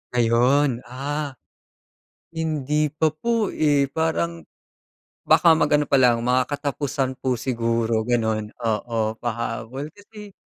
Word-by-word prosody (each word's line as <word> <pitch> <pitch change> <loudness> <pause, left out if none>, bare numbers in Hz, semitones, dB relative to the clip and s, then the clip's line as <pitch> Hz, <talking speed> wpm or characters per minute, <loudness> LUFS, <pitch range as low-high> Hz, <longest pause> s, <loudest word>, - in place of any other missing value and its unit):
Ayon, 125 +3 +3
ah, 140 +3 -4 1.0
hindi 150 -2 0
pa 155 +1 0
po, 230 +5 -1
eh, 145 -2 +2
parang, 85 - -1 0.8
baka 165 -1 +5
mag-ano 150 -1 +2
palang 125 -4 +4
mga 125 +1 +2
katapusan 140 -2 -2
po 130 -2 0
siguro 115 -2 0
ganun, 110 -2 -1
oo, 110 -1 -1
pahabol 120 +3 -4
kasi. 205 0 -13
130 Hz, 105 wpm, -23 LUFS, 115-150 Hz, 1.0 s, baka